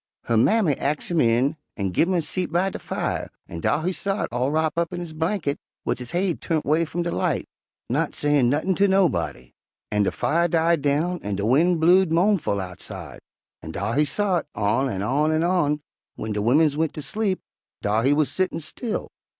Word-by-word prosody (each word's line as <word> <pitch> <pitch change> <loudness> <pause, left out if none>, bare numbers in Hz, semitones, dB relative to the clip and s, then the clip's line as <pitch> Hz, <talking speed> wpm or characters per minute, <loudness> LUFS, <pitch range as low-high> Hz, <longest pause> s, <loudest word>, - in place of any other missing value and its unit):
Her 115 - 0
mammy 180 - +4
ax 150 +4 -2
him 165 -3 +3
in 125 +6 +2 0.2
an' 95 -3 -2
gin 165 - +3
him 190 - 0
a 170 - +2
seat 180 +1 -2
by 180 +3 +1
de - - -6
fire, - - -3 0.2
an' 85 - -7
dar 150 - 0
he 185 - +1
sot 195 +2 -1
all 125 +3 0
wrop 155 +1 0
up 170 +1 0
in 175 - -3
his 170 -3 -6
blinkit, 160 -2 -1 0.3
wid - - -1
his 125 -1 -6
haid 175 0 -1
turnt 160 -2 -1
'way 155 +4 +2
f'um 170 +2 -3
de 170 - -2
light, - - -1 0.4
not - - -1
sayin' 145 -4 +2
nuttin' 155 +8 +1
ter 200 +2 +3
nob'dy. 185 - 0 0.4
An' 105 -1 +2
de 100 - +2
fire 165 +8 +1
died 165 -1 +2
down 155 +5 0
an' 100 -1 -3
de 100 +1 -2
wind 160 +9 +3
blewed 180 +2 +5
mo'nful 175 - +2
outside, 90 -1 -7 0.4
an' - - -8
dar 115 - -2
he 150 - +3
sot 185 0 0
on 110 +6 +1
an' 95 -4 -3
on, 145 +7 +1
an' 155 0 +1 0.8
w'en 110 0 -3
de 105 - -1
wimmins 145 +7 +3
went 160 0 -1
ter 150 - -4
sleep, 190 +6 -1 0.4
dar 105 +2 +2
he 135 +4 +3
wuz 150 +1 +3
settin', 185 +5 -1
still. 215 - -4
155 Hz, 205 wpm, -24 LUFS, 125-175 Hz, 0.8 s, blewed